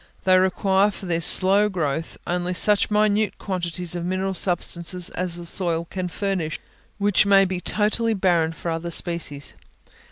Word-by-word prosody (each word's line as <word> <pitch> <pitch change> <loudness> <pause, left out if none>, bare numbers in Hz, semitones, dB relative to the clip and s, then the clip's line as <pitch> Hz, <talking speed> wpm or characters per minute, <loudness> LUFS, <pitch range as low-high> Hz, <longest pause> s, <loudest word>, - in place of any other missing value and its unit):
They 185 -1 +4
require, 190 +2 +2
for 200 - -9
their 170 -2 -1
slow 195 +4 +5
growth, 160 -4 -3
only 180 +1 -2
such 205 +2 +2
minute 210 0 +1
quantities 180 -2 -4
of 175 - -4
mineral 185 +2 -2
substances 175 -1 +1
as 180 -1 -2
the 175 - -7
soil 170 -1 0
can 185 -1 -3
furnish, 180 -3 -3 0.4
which 205 0 +2
may 195 -1 +5
be 185 -1 -4
totally 220 +3 0
barren 175 -4 +1
for 165 +1 -5
other 165 +1 -4
species. 165 -5 -2
185 Hz, 155 wpm, -22 LUFS, 170-195 Hz, 0.4 s, slow